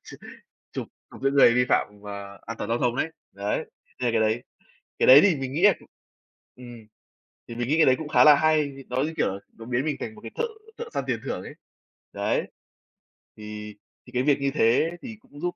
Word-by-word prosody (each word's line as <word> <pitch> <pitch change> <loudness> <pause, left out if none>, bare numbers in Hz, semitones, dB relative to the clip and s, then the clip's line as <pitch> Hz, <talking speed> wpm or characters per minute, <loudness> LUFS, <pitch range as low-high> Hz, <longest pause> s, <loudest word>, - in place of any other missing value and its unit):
chụp - - -12 0.5
chụp - - -5 0.3
giữ 135 - +2
người 135 -4 +6
vi 125 +1 +3
phạm - - +3
và 100 -1 -8
an 115 +1 -6
toàn - - -4
giao 115 - +1
thông 120 -1 0
ấy. 160 +4 -1 0.2
Đấy, 100 +1 -3 0.3
hay 120 -2 0
cái 115 -1 +2
đấy. 110 +2 +1 0.6
Cái - - +3
đấy 135 +3 +10
thì 190 -6 +4
mình 135 -1 -5
nghĩ 160 - -2
là 205 -2 +7 0.8
ừm, 120 -3 -12 0.6
thì 115 - -8
mình 120 0 -2
nghĩ 155 - +2
cái 160 - +6
đấy 130 - +5
cũng 160 - -6
khá - - +5
là 150 -1 +9
hay, 155 -2 +2 0.2
nó, 125 +1 0
như 160 +2 -3
kiểu, 95 - 0 0.2
nó 115 - -10
biến 125 +4 -1
mình 150 - -1
thành 220 - -6
một 210 - -14
cái - - -9
thợ 470 - 0 0.3
thợ 470 -1 -6
săn - - -1
tiền - - -1
thưởng - - -3
ấy. - - -9 0.6
Đấy. - - -1 0.9
Thì 105 0 -8 0.3
thì - - -13
cái 125 +1 +1
việc 145 -1 +3
như 140 0 +1
thế 130 +6 +3
thì 230 -3 -8
cũng 145 - -16
giúp 175 +3 -3
130 Hz, 220 wpm, -25 LUFS, 115-155 Hz, 0.9 s, đấy